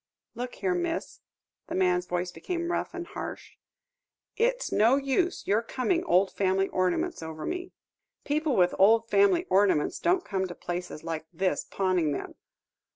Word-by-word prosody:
"Look 245 +1 -5
here, 380 -1 0
miss" 345 -2 -3 0.5
the - - -4
man's 180 -1 +2
voice 180 0 -2
became 340 - -3
rough 350 - -2
and 350 -1 -4
harsh - - -8 0.8
"it's - - 0
no 225 +5 +5
use 280 +6 0
your 210 +3 +2
coming 270 +9 -1
old 190 +2 +3
family 195 0 +1
ornaments 185 -2 0
over 160 -1 -6
me. 360 0 -4 0.5
People 300 -1 0
with 180 -1 +4
old 225 +4 +5
family 380 -3 +4
ornaments 190 -6 +3
don't 360 +2 +1
come 190 -1 -1
to 175 - -8
places 175 -3 -5
like 160 -1 -4
this 185 -1 -1
pawning 185 -6 0
them. - - -5
205 Hz, 155 wpm, -28 LUFS, -, 0.8 s, no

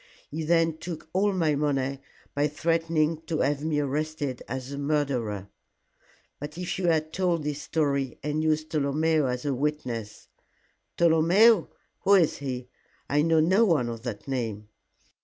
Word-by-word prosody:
He 155 +2 -3
then 165 0 +2
took 160 -2 -7
all 200 +2 +2
my 165 -5 +1
money 140 -2 0 0.3
by 145 +1 +2
threatening 165 0 0
to 160 - -1
have 145 +1 0
me 155 -1 0
arrested 145 -2 -2
as 130 +1 -5
the 140 - -5
murderer." 130 -9 -1 0.9
"But 150 +2 -7
if 180 +1 -3
you 180 - 0
had 160 -1 +1
told 175 -4 0
this 150 0 -3
story, 140 -5 -1
and 150 +1 -1
used 155 0 0
Tolomeo 155 0 +1
as 125 +2 -3
a 140 - +1
witness 125 -6 -3 0.3
" - - -43
"Tolomeo? 170 +5 +5 0.3
who 200 - +5
is 170 -5 +3
he? 130 -3 -4 0.4
I 145 +1 +4
know 160 0 +3
no 190 +8 +4
one 160 - +2
of 115 -1 -6
that 120 -2 -6
name." 110 -6 -3
150 Hz, 160 wpm, -27 LUFS, 135-165 Hz, 0.9 s, Tolomeo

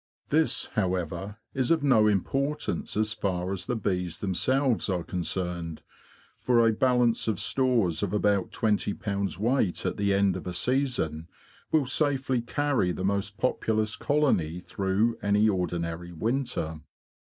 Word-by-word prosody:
This, 155 +2 +2
however, 95 -1 -2 0.2
is 130 -2 0
of 165 -3 +2
no 120 -7 +5
importance 135 +8 -1
as 110 0 +1
far 95 -4 -2
as 95 - -4
the 125 - 0
bees 90 -5 -2
themselves 125 +6 +1
are 90 -3 -1
concerned, 85 -2 -3 0.6
for 120 -2 +3
a 115 - +3
balance 125 -1 +2
of 105 -6 0
stores 120 -11 +1
of 100 -3 -1
about 100 -2 +1
twenty 105 -2 0
pounds 100 -3 -3
weight 110 -3 0
at - - -1
the 100 0 +1
end 100 -2 +2
of 90 - -6
a 90 - -3
season 125 - 0 0.4
will 155 -3 +3
safely 135 -2 +2
carry 130 -5 0
the 95 +1 -3
most 100 +1 -1
populous 110 -4 0
colony 105 - +1
through 100 +5 -1
any 105 +1 +3
ordinary 85 -3 -2
winter. 90 - -2
105 Hz, 140 wpm, -27 LUFS, 90-125 Hz, 0.6 s, no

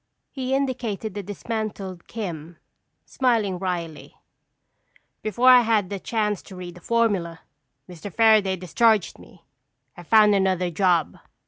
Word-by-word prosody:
He 265 -1 -2
indicated 240 -6 -3
the 205 - -5
dismantled 200 -2 -6
"Kim," 170 -7 -7 0.5
smiling 225 -8 0
wryly. 175 -4 -5 1.1
"Before 235 +4 +2
I 250 -1 +9
had 215 -4 0
a 200 - -4
chance 210 -2 -2
to 190 - -13
read 180 -1 -8
the 180 - -15
formula, 195 -7 0 0.5
Mr. 180 +2 -9
Fairaday 215 -3 +4
discharged 210 +3 +1
me. 170 - -18 0.5
I - - -11
found 210 +4 +5
another 185 -2 +1
job. 175 -2 +1
200 Hz, 125 wpm, -23 LUFS, 180-225 Hz, 1.1 s, I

